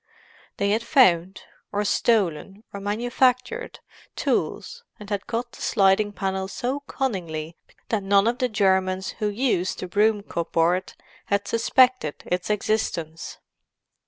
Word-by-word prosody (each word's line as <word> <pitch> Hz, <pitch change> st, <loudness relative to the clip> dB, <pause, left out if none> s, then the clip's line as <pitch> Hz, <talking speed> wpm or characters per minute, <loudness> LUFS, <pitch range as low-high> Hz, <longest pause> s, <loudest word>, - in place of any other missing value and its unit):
They 200 Hz, 0 st, +1 dB
had 220 Hz, +2 st, +1 dB
found, 190 Hz, -, +3 dB, 0.3 s
or 205 Hz, 0 st, -1 dB
stolen, 200 Hz, -3 st, 0 dB
or 200 Hz, -, -5 dB
manufactured, 245 Hz, -, 0 dB, 0.3 s
tools, 480 Hz, 0 st, -2 dB, 0.2 s
and 210 Hz, -, -10 dB
had 200 Hz, -1 st, -2 dB
cut 240 Hz, +1 st, -3 dB
the -, -, -14 dB
sliding 200 Hz, 0 st, +3 dB
panel 190 Hz, -1 st, -2 dB
so 255 Hz, +7 st, -3 dB
cunningly 170 Hz, -, -3 dB, 0.3 s
that 220 Hz, -3 st, 0 dB
none 195 Hz, +1 st, +3 dB
of 240 Hz, +1 st, 0 dB
the 255 Hz, -, +1 dB
Germans 190 Hz, -2 st, +1 dB
who 210 Hz, -, 0 dB
used 205 Hz, -5 st, 0 dB
the 185 Hz, -, -5 dB
broom 210 Hz, +2 st, +2 dB
cupboard 170 Hz, +1 st, 0 dB, 0.3 s
had 200 Hz, 0 st, -1 dB
suspected 250 Hz, -, +2 dB
its 180 Hz, +2 st, -2 dB
existence. 185 Hz, -6 st, -2 dB
200 Hz, 130 wpm, -24 LUFS, 185-230 Hz, 0.3 s, found